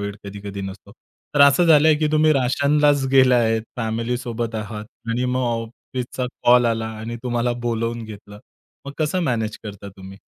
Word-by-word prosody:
वेळ 100 0 -4
कधी-कधी 100 0 -7
नसतो. 95 0 -9 0.4
तर 145 - +2
असं 140 +5 +6
झालंय, 155 -1 +6
की 155 0 0
तुम्ही 155 0 +4
राशनलाच 140 +2 +2
गेला 130 -2 +6
आहेत, 115 -2 +1
फॅमिलीसोबत 115 0 -3
आहात 110 0 -5 0.3
आणि 120 +2 0
मग 125 +1 0
ऑफिसचा 120 +2 -5 0.2
कॉल 125 0 +5
आला 115 -1 -1
आणि 115 +2 -6
तुम्हाला 120 -1 0
बोलावून 115 0 -2
घेतलं. 105 -1 -11 0.5
मग 140 - -6
कसं 160 +4 0
मॅनेज 110 -7 -2
करता 100 -1 -8
तुम्ही? 95 0 -11
120 Hz, 155 wpm, -21 LUFS, 110-130 Hz, 0.5 s, असं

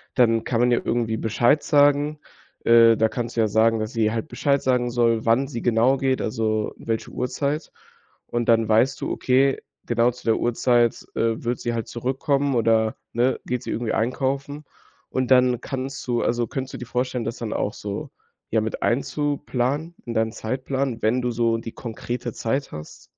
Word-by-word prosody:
Dann 115 -3 +3
kann 115 - -1
man 125 - +3
ja 120 - +3
irgendwie 115 -2 0
Bescheid 120 +7 +2
sagen. 145 +1 +3 0.4
Äh, 115 -1 +6
da 110 - +3
kannst 120 +1 -4
du 115 - +2
ja 110 - +3
sagen, 110 +2 +3
dass 110 +4 -4
sie 110 -2 +1
halt 115 +6 -3
Bescheid 140 -2 0
sagen 125 -2 +1
soll, 115 -2 +1
wann 115 +4 +3
sie 120 -4 -5
genau 120 +3 +3
geht, 130 0 0
also, 110 -1 -1
welche 115 -1 -3
Uhrzeit. 145 +4 -2 0.6
Und 120 -1 -2
dann 115 -1 +4
weißt 120 +5 +3
du: - - -2
Okay, 135 +1 +2 0.3
genau 120 +1 +2
zu 125 - -15
der 115 -1 +3
Uhrzeit, 120 0 +1
äh, 115 0 +1
wird 120 +1 -1
sie 120 - -2
halt 115 -1 -3
zurückkommen 135 +3 -1
oder, 110 -1 +2 0.2
ne, 125 +3 +1
geht 125 -1 -3
sie - - -5
irgendwie 115 -1 -2
einkaufen. 135 +4 -2 0.4
Und 130 -1 -1
dann 125 -1 +4
kannst 135 0 -5
du 120 -1 +1
also, 120 0 0
könntest 130 +2 -5
du - - -5
dir 125 - -7
vorstellen, 125 0 -2
das 115 +2 -4
dann 115 -2 -4
auch 105 - -1
so, 100 -1 -6 0.4
ja, 110 - +3
mit 110 0 -4
einzuplanen 145 +3 -1
in 120 - -4
deinen 110 0 +1
Zeitplan, 130 +1 -3
wenn 115 +4 +2
du 125 0 -1
so 115 0 +1
die 115 0 -7
konkrete 120 0 -5
Zeit 135 +5 -2
hast? 75 0 -10
120 Hz, 185 wpm, -23 LUFS, 115-130 Hz, 0.6 s, Äh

